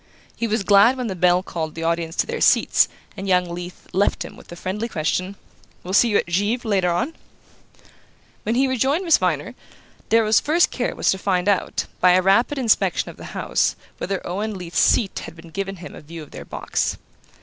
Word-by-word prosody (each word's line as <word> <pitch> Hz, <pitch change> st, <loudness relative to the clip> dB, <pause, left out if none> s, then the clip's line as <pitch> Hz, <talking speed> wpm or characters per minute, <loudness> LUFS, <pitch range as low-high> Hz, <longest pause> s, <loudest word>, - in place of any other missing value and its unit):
He 235 Hz, -, -2 dB
was 215 Hz, -1 st, 0 dB
glad 205 Hz, +6 st, +5 dB
when 250 Hz, -, -3 dB
the 195 Hz, -4 st, -3 dB
bell 180 Hz, +1 st, +3 dB
called 160 Hz, -4 st, -5 dB
the 165 Hz, -, -5 dB
audience 165 Hz, 0 st, -1 dB
to -, -, +1 dB
their 470 Hz, -1 st, -4 dB
seats, -, -, +4 dB, 0.3 s
and 195 Hz, -1 st, -6 dB
young 180 Hz, -1 st, +3 dB
Leath 175 Hz, +1 st, -8 dB
left 200 Hz, +2 st, +1 dB
him -, -, -10 dB
with -, -, -16 dB
the 175 Hz, -, -9 dB
friendly 200 Hz, +6 st, -4 dB
question: 185 Hz, +3 st, -2 dB, 0.5 s
"We'll 185 Hz, -, -5 dB
see 235 Hz, +4 st, +5 dB
you 205 Hz, -, +3 dB
at -, -, 0 dB
Givre 205 Hz, +8 st, -1 dB
later 190 Hz, -4 st, +2 dB
on?" 175 Hz, -, -1 dB, 1.3 s
When 225 Hz, +2 st, -1 dB
he 265 Hz, +2 st, +3 dB
rejoined 270 Hz, -, 0 dB
Miss 335 Hz, -, +5 dB
Viner, -, -, -1 dB, 0.6 s
Darrow's 220 Hz, -1 st, +4 dB
first 330 Hz, +3 st, +2 dB
care 250 Hz, -, -2 dB
was -, -, +2 dB
to 190 Hz, -, -2 dB
find 185 Hz, -1 st, 0 dB
out, 200 Hz, -2 st, 0 dB
by 180 Hz, -1 st, +5 dB
a 185 Hz, -, +4 dB
rapid 235 Hz, +9 st, +3 dB
inspection 240 Hz, -5 st, +1 dB
of -, -, -19 dB
the -, -, -9 dB
house, -, -, +1 dB, 0.2 s
whether 195 Hz, -1 st, -3 dB
Owen 205 Hz, +3 st, -3 dB
Leath's 175 Hz, -2 st, -3 dB
seat 200 Hz, -5 st, +2 dB
had 165 Hz, 0 st, -11 dB
given 195 Hz, 0 st, -3 dB
him 180 Hz, -, -10 dB
a -, -, -10 dB
view 160 Hz, +1 st, -9 dB
of 150 Hz, -, -15 dB
their -, -, -9 dB
box. -, -, -2 dB
195 Hz, 205 wpm, -22 LUFS, 175-230 Hz, 1.3 s, glad